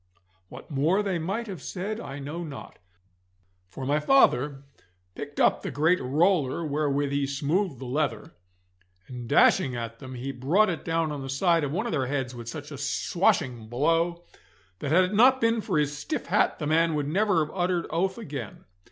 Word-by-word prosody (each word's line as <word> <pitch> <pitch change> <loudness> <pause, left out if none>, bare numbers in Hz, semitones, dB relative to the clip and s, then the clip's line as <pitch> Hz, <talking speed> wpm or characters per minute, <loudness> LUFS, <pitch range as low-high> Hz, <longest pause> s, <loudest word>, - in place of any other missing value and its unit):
What 130 +6 -12
more 160 +9 +2
they 190 -4 -1
might 195 +8 -2
have 190 -9 -7
said 205 +8 -4
I 140 0 -7
know 150 +5 -5
not, 150 -4 -9 0.9
for 130 +8 -7
my 145 +3 +2
father 145 - +3 0.5
picked 145 +6 -7
up - - +3
the - - -4
great 160 +5 +2
roller 155 +2 +1
wherewith 145 -1 0
he 140 -1 0
smoothed 145 +4 -1
the 130 - -8
leather, 145 +4 -2 0.8
and 120 -2 -8
dashing 130 -2 +4
at 115 -1 -5
them 130 -2 -8
he 130 +3 -4
brought 165 +11 +2
it 165 - -5
down 165 -1 0
on 145 -2 -5
the 135 - -6
side 165 +4 +2
of 140 - -2
one 170 - -1
of - - -2
their 135 -5 0
heads 130 -2 -2
with 120 -1 -8
such - - -7
a - - -7
swashing 120 -4 0
blow, 165 +8 0 0.6
that 140 - -3
had 185 +4 +5
it 185 +2 -2
not 255 +5 +6
been 230 -1 +2
for 190 -6 -1
his 145 -1 0
stiff 150 - -4
hat - - +2
the 150 - -4
man 160 +1 +2
would 145 -1 -1
never 185 -1 +2
have - - -12
uttered 175 -1 0
oath 190 +5 0
again. 140 - -7
150 Hz, 190 wpm, -26 LUFS, 135-175 Hz, 0.9 s, not